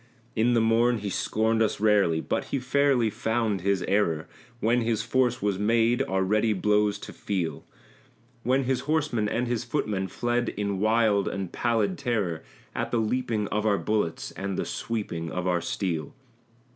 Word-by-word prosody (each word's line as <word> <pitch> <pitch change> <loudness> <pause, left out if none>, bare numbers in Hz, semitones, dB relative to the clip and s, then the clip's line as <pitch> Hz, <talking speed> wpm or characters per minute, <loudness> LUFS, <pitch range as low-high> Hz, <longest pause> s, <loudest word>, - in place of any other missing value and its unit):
In 120 +2 +3
the 115 - +4
morn 115 +2 +3
he 100 -2 -4
scorned 110 +3 +1
us 110 - +1
rarely, 100 -7 +3
but - - -2
he - - -2
fairly 130 -3 +2
found 110 -3 -1
his 95 -1 +1
error, 85 -6 +1 0.3
When 120 +2 +2
his 115 -2 0
force 125 -2 +1
was 100 -2 0
made 115 +3 +3
our 95 0 0
ready 105 +3 +2
blows 105 +1 +2
to - - -9
feel; 90 -5 -3 0.8
When 130 +3 +2
his 130 0 0
horsemen 145 -9 +1
and 120 +3 0
his 120 -1 -1
footmen 105 -7 -1
fled 120 +5 -1
in 100 -1 -2
wild 110 -2 +3
and 95 -3 -3
pallid 115 -4 0
terror 105 - -1 0.3
At - - -2
the 120 - 0
leaping 115 -2 0
of 105 0 -1
our 100 -2 +3
bullets 105 -7 -1
and 100 -1 -4
the - - -1
sweeping 95 -8 -3
of 90 0 -3
our 90 -1 +1
steel. 80 -7 -3
110 Hz, 170 wpm, -27 LUFS, 100-120 Hz, 0.8 s, the